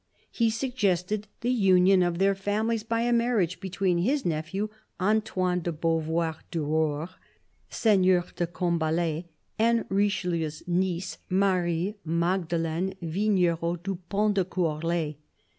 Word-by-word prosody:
He 230 Hz, -1 st, +2 dB
suggested 215 Hz, -4 st, -1 dB
the 240 Hz, +1 st, +1 dB
union 190 Hz, -4 st, +5 dB
of 175 Hz, -1 st, +1 dB
their 195 Hz, +2 st, +3 dB
families 210 Hz, +3 st, -1 dB
by 230 Hz, +1 st, -1 dB
a 240 Hz, +1 st, +2 dB
marriage 230 Hz, -7 st, +1 dB
between 185 Hz, -1 st, 0 dB
his 265 Hz, +10 st, +1 dB
nephew, 175 Hz, +6 st, -2 dB, 0.3 s
Antoine 185 Hz, -3 st, +1 dB
de 170 Hz, -, -2 dB
Beauvoir 165 Hz, 0 st, 0 dB
du 165 Hz, -3 st, -2 dB
Roure, 155 Hz, +1 st, 0 dB, 0.6 s
Seigneur 185 Hz, -5 st, +3 dB
de 175 Hz, -, -1 dB
Combalet, 170 Hz, -1 st, -1 dB, 0.3 s
and 230 Hz, +1 st, +3 dB
Richelieu's 180 Hz, -6 st, 0 dB
niece, 180 Hz, +1 st, -1 dB
Marie 185 Hz, 0 st, +1 dB
Magde 170 Hz, +2 st, 0 dB
leine 170 Hz, +3 st, -1 dB
Vignerot 175 Hz, -2 st, 0 dB
du 195 Hz, 0 st, -2 dB
Pont 210 Hz, +1 st, +2 dB
de 195 Hz, -2 st, +2 dB
Courlay. 165 Hz, -3 st, -1 dB
180 Hz, 125 wpm, -27 LUFS, 170-205 Hz, 0.6 s, union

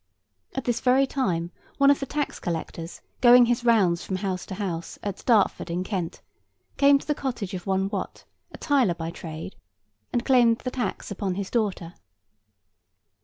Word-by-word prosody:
At 265 Hz, -, -2 dB
this 240 Hz, -1 st, 0 dB
very 260 Hz, +2 st, +4 dB
time 180 Hz, -11 st, -1 dB, 0.3 s
one 280 Hz, 0 st, +6 dB
of 285 Hz, -, +2 dB
the 275 Hz, -, -4 dB
tax 295 Hz, +1 st, -3 dB
collectors, 165 Hz, 0 st, -5 dB, 0.2 s
going 245 Hz, 0 st, +8 dB
his 240 Hz, 0 st, 0 dB
rounds 200 Hz, -8 st, +3 dB
from 190 Hz, -, -3 dB
house 185 Hz, -1 st, -3 dB
to 190 Hz, -, -5 dB
house, 175 Hz, -4 st, -4 dB
at 200 Hz, -2 st, -5 dB
Dartford 215 Hz, -6 st, +3 dB
in 175 Hz, +2 st, -1 dB
Kent 185 Hz, -4 st, -4 dB, 0.5 s
came 280 Hz, 0 st, +6 dB
to -, -, -10 dB
the 300 Hz, -, +1 dB
cottage 240 Hz, -9 st, -4 dB
of 185 Hz, +1 st, -6 dB
one 190 Hz, 0 st, +1 dB
Wat, 200 Hz, -2 st, -5 dB, 0.3 s
a -, -, -10 dB
tiler 260 Hz, -, +2 dB
by 165 Hz, 0 st, -5 dB
trade, 165 Hz, +2 st, -8 dB, 0.6 s
and 240 Hz, -, -1 dB
claimed 240 Hz, -4 st, +5 dB
the 255 Hz, -, -5 dB
tax 240 Hz, -5 st, -4 dB
upon 195 Hz, -2 st, -2 dB
his 195 Hz, 0 st, -4 dB
daughter. 195 Hz, -7 st, -1 dB
200 Hz, 170 wpm, -25 LUFS, 180-250 Hz, 0.6 s, going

